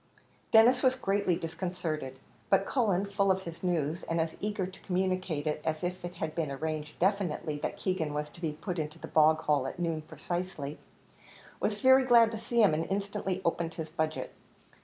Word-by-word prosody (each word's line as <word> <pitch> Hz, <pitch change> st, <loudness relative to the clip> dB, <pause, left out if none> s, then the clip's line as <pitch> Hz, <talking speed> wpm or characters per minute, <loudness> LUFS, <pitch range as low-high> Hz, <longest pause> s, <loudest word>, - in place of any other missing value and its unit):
Denis 240 Hz, +3 st, +6 dB
was 260 Hz, -1 st, +4 dB
greatly 200 Hz, -6 st, +1 dB
disconcerted, 165 Hz, -5 st, -4 dB, 0.3 s
but -, -, +4 dB
Cullen, 205 Hz, -7 st, +1 dB
full 200 Hz, 0 st, +1 dB
of 190 Hz, 0 st, +2 dB
his 170 Hz, -2 st, -8 dB
news, 170 Hz, -2 st, 0 dB
and 165 Hz, 0 st, -2 dB
as 160 Hz, 0 st, 0 dB
eager 205 Hz, -2 st, -1 dB
to 185 Hz, +1 st, -10 dB
communicate 185 Hz, -4 st, -1 dB
it 150 Hz, 0 st, -1 dB
as 155 Hz, +1 st, -2 dB
if 180 Hz, +1 st, -3 dB
it 175 Hz, +1 st, -6 dB
had 160 Hz, -2 st, -3 dB
been 160 Hz, -3 st, -1 dB
arranged 150 Hz, +2 st, -4 dB
definitely 175 Hz, -6 st, 0 dB
that -, -, -3 dB
Keegan 185 Hz, -6 st, -1 dB
was 150 Hz, 0 st, -3 dB
to 170 Hz, -, -14 dB
be 160 Hz, -3 st, -1 dB
put 175 Hz, +3 st, -4 dB
into 155 Hz, +1 st, -4 dB
the -, -, -8 dB
bog 155 Hz, 0 st, +4 dB
hole 145 Hz, -3 st, +1 dB
at -, -, -6 dB
noon 165 Hz, -2 st, -1 dB
precisely, 165 Hz, -2 st, -5 dB, 0.8 s
was 210 Hz, -1 st, -1 dB
very 260 Hz, 0 st, +7 dB
glad 235 Hz, -3 st, +6 dB
to 220 Hz, -, -4 dB
see 230 Hz, 0 st, +2 dB
him, 195 Hz, -, +5 dB
and 160 Hz, +2 st, -1 dB
instantly 195 Hz, -1 st, -2 dB
opened 165 Hz, 0 st, -1 dB
his 160 Hz, -1 st, -5 dB
budget. 155 Hz, -1 st, -2 dB
175 Hz, 190 wpm, -30 LUFS, 155-195 Hz, 0.8 s, very